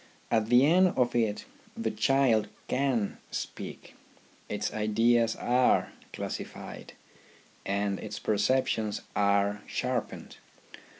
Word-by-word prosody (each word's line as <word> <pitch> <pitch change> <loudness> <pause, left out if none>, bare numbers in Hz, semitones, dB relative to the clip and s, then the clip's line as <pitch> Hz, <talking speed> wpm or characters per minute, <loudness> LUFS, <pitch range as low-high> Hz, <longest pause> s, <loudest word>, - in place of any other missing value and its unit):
At 110 -2 +2
the 125 +2 +6
end 180 +3 +4
of 125 -2 +2
it 110 -3 0 0.3
the - - -1
child 130 -6 +2 0.2
can 125 -6 0
speak, - - -6 0.6
its 105 0 -2
ideas 115 +2 +2
are 125 +1 +2 0.2
classified, - - -7 0.7
and 100 -1 -1
its - - -6
perceptions 110 -1 0
are 100 0 +2
sharpened. 125 -2 -3
115 Hz, 100 wpm, -29 LUFS, 105-125 Hz, 0.7 s, the